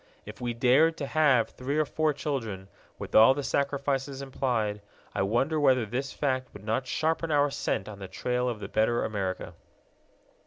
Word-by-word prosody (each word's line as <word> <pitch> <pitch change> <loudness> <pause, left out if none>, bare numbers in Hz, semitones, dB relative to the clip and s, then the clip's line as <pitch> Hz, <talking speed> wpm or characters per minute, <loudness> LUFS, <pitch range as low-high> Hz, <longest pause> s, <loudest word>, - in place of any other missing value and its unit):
If - - -10
we 120 -1 -2
dared 135 +7 +4
to 140 - -3
have 140 -7 +3
three 135 +4 -3
or 155 - +3
four 155 +1 0
children, 115 -10 -4 0.3
with - - -8
all 115 +5 +7
the 145 - -3
sacrifices 140 0 -1
implied, 115 -6 -1 0.3
I - - -1
wonder 120 +10 +1
whether 130 -5 +3
this 130 +5 -3
fact 130 -3 -2
would 105 - -11
not 115 +4 -1
sharpen 160 +4 0
our 145 -1 +3
scent 95 - -2
on 105 -2 -9
the 95 - -7
trail 125 +6 -1
of 115 -3 -4
the 100 - -6
better 110 +3 +1
America. 95 -3 -3
130 Hz, 180 wpm, -28 LUFS, 110-140 Hz, 0.3 s, all